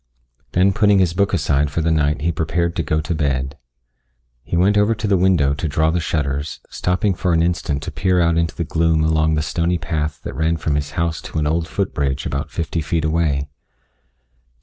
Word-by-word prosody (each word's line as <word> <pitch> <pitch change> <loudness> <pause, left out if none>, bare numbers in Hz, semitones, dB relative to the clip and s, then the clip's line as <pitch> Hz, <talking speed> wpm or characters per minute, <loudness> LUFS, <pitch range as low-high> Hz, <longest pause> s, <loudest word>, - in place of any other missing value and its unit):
Then 95 +2 +3
putting 105 -1 +4
his 90 -3 +2
book 100 +2 +1
aside 75 -5 +1
for 80 +4 -2
the 80 +1 +1
night 75 -1 +1
he 85 +3 +1
prepared 85 +2 -1
to - - 0
go 75 0 0
to 80 +3 -3
bed. 70 -3 -1 0.9
He 85 - -2
went 95 +4 +3
over 105 +2 +3
to 110 +1 -4
the 100 - +3
window 90 -7 +3
to 80 +3 -3
draw 80 +2 +1
the 90 - 0
shutters, 70 -2 -2
stopping 90 +3 0
for 90 0 0
an 80 0 +3
instant 85 -4 -1
to - - -5
peer 90 -2 +1
out 85 -1 +3
into 85 -2 0
the 85 - -2
gloom 80 -1 +1
along 80 0 +2
the 75 - 0
stony 85 +2 0
path 80 -2 -3
that - - -5
ran 80 +1 +1
from 80 -2 -1
his 75 0 -2
house 85 -1 -1
to - - -7
an 75 - +1
old 80 +2 0
foot 100 -1 -2
bridge 70 -1 -1
about 70 -1 -3
fifty 80 0 -3
feet 80 +1 -1
away. 80 -3 0
80 Hz, 215 wpm, -20 LUFS, 75-85 Hz, 0.9 s, putting